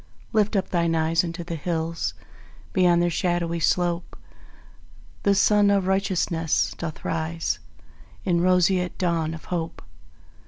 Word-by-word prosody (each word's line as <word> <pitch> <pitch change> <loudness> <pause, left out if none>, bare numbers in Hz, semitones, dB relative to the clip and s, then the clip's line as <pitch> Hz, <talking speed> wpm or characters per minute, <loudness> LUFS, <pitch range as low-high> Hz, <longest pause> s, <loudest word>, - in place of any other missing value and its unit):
Lift 215 0 +2
up 195 - 0
thine 170 -2 +1
eyes 165 +1 +2
unto 170 0 -5
the 170 0 -6
hills; 165 0 -2 0.6
Beyond 175 -2 +4
their 175 - +1
shadowy 170 0 0
slope 175 +1 0 1.0
The 200 -1 +3
Sun 205 +1 +4
of 200 -2 +2
Righteousness 185 -4 +1
doth 165 -2 -6
rise 165 0 -2 0.7
In 175 -3 +2
roseate 180 0 +2
dawn 165 -3 0
of 160 - -11
Hope. 165 -1 -4
170 Hz, 125 wpm, -24 LUFS, 165-185 Hz, 1.0 s, Beyond